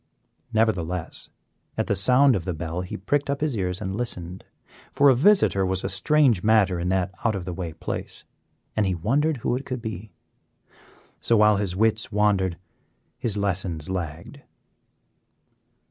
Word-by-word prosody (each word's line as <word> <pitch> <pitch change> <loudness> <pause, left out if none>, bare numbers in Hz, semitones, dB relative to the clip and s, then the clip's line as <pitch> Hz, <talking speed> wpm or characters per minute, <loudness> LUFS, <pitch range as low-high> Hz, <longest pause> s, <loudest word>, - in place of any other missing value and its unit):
Nevertheless, 90 -7 -1 0.5
at - - 0
the - - 0
sound 125 +7 +5
of 95 - -2
the 90 -1 -3
bell 85 +2 -4
he 90 - -6
pricked 140 +9 -1
up 140 0 -1
his 150 -5 0
ears 90 -3 -2
and 95 -2 -4
listened, 90 -6 -5 0.5
for 140 0 +5
a 130 - +5
visitor 145 - +4
was 95 0 0
a - - -2
strange 120 +2 +2
matter 105 -4 +3
in 90 +1 -2
that 95 0 0
out 110 -3 +1
of 95 -3 -5
the 90 - -4
way 85 -2 -5
place, - - -6 0.5
and 110 -2 +1
he 95 - 0
wondered 140 - 0
who - - +1
it 130 - -4
could 130 -2 -5
be. 110 -2 -7 1.1
So, 115 - +2
while 105 -1 +5
his 100 -3 -2
wits 110 +2 +1
wandered 100 -4 +1 0.6
his 110 -3 +2
lessons 95 -5 -2
lagged. 85 -3 -6
100 Hz, 160 wpm, -24 LUFS, 90-115 Hz, 1.1 s, sound